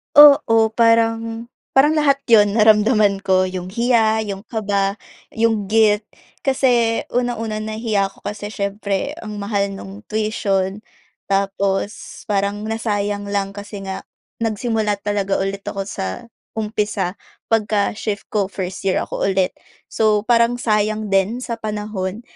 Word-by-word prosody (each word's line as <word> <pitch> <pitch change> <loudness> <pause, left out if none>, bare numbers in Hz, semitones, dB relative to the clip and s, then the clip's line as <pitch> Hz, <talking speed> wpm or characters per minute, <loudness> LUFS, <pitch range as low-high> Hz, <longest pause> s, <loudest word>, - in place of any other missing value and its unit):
Oo. 230 -7 +7
Parang, 230 0 +1 0.2
parang 270 +3 +6
lahat 275 -2 +2
'yon 205 -2 +6
naramdaman 215 -2 +4
ko. 190 -1 +2
'Yong 185 -1 -5
hiya, 230 -2 +3
'yong 200 -1 -6
kaba, 200 -3 -1 0.4
'yong 225 -2 +1
guilt. 210 0 +3 0.4
Kasi 245 -4 +2
unang-una, 235 -3 -1
nahiya 215 -2 -1
ako 195 - -14
kasi 205 0 -5
siyempre 205 - -3
ang 210 -2 -6
mahal 200 -1 -1
nung 195 +2 -10
tuition 205 -3 -1 0.5
tapos 195 +1 -1
parang 200 +1 0
nasayang 205 -2 -2
lang 200 -1 0
kasi 205 0 -7
nga, 190 0 -6 0.3
nagsimula 220 -1 0
talaga 200 -1 -1
ulit 195 +1 -3
ako 195 0 -4
sa 95 - -5 0.2
umpisa 210 -3 -2 0.3
pagka-shift 210 -1 0
ko, 205 -2 +1
first 190 -1 -6
year 190 - +2
ako - - -3
ulit. 190 -1 +1 0.4
So, 215 -1 +2
parang 235 +1 +2
sayang 215 -1 0
din 195 +5 +1
sa 235 -2 -3
panahon. 210 -1 -4
210 Hz, 125 wpm, -20 LUFS, 200-225 Hz, 0.5 s, Oo